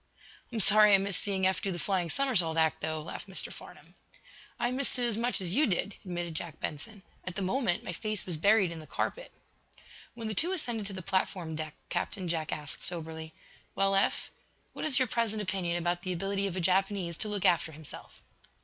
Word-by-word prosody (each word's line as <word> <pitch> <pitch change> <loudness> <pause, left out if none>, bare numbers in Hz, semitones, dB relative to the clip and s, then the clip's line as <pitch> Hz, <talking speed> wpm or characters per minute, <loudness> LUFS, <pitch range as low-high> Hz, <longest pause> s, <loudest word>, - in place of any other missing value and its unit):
"I'm 225 -2 -1
sorry 210 0 +8
I - - +7
missed 195 -1 0
seeing 195 -2 0
Eph 190 0 +2
do 195 - -1
the 175 - -3
flying 175 0 0
somersault 190 - +4
act, 160 -2 +2
though," 155 -1 -2
laughed - - -7
Mr. - - -4
Farnum. - - -13 0.7
"I 240 - +1
missed 265 +1 0
it 245 - +2
as 235 -3 +2
much 235 +2 +1
as 180 -1 -2
you 295 +7 +4
did," 200 +1 0
admitted 175 -2 -4
Jack 160 0 -6
Benson. 190 +7 -6 0.2
"At 185 -1 -6
the 200 - -2
moment 190 -2 +1
my 175 - -5
face 215 +4 -3
was 175 - -3
buried 200 +2 +4
in 165 - -6
the 155 - -11
carpet." - - -3 0.8
When 230 -2 -5
the 215 - -2
two 345 - +3
ascended 235 - -2
to 200 - -6
the 185 -1 -6
platform 180 -3 -1
deck 155 -1 -5
Captain 185 -3 -2
Jack 160 -2 -1
asked, 150 -2 -3
soberly: 160 -2 -2 0.4
"Well, 195 0 +2
Eph, 195 - +1 0.4
what - - -4
is 300 -5 +4
your 260 -2 +3
present 225 -2 -1
opinion 180 -4 -1
about 175 0 -1
the 185 0 -3
ability 195 +3 -1
of 185 - -4
a - - -1
Japanese 190 -1 +1
to - - -1
look 205 -3 -1
after 170 -2 +3
himself?" 155 -1 -11
190 Hz, 210 wpm, -30 LUFS, 170-215 Hz, 0.8 s, sorry